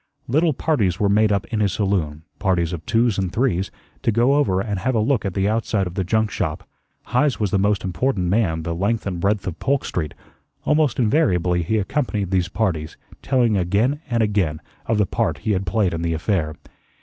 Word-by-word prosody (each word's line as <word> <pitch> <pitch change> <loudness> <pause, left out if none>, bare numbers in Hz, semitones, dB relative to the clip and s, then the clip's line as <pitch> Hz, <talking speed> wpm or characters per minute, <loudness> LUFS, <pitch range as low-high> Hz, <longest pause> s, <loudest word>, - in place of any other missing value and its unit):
Little 155 +5 +2
parties 105 - 0
were 100 - +2
made 105 +1 +3
up 100 -1 0
in 110 - +1
his 100 -4 +1
saloon 85 -7 -1 0.2
parties 90 -2 +1
of 85 -2 -5
twos 115 -3 +2
and 95 -2 -1
threes 100 -4 0 0.3
to - - +2
go 120 +5 +3
over 135 -11 +2
and 100 -1 -2
have 125 +6 0
a - - +3
look 115 0 +1
at 95 - -3
the 95 0 +1
outside 110 -2 0
of 90 - -6
the 95 0 -1
junk 110 +3 +1
shop. 75 -2 -3 0.4
Heise 130 +2 +1
was 105 -4 0
the 100 - +2
most 100 +1 +1
important 95 +2 -1
man 85 -5 +1
the 85 +1 -2
length 100 +6 -1
and 95 -3 -3
breadth 100 +3 0
of 95 - -5
Polk 140 +1 0
Street; 80 -4 -3 0.5
almost 150 -4 +2
invariably 90 - +2
he 110 +7 0
accompanied 105 -3 -1
these 90 -2 +1
parties, 85 -7 -2 0.2
telling 120 -5 +2
again 105 - +1
and 115 -2 +2
again 95 -8 0 0.3
of 115 - +1
the 105 - +3
part - - -1
he 110 - +2
had 95 -1 -1
played 95 -1 +1
in 85 - -3
the 85 -1 0
affair. 80 -2 -1
100 Hz, 210 wpm, -22 LUFS, 90-115 Hz, 0.5 s, made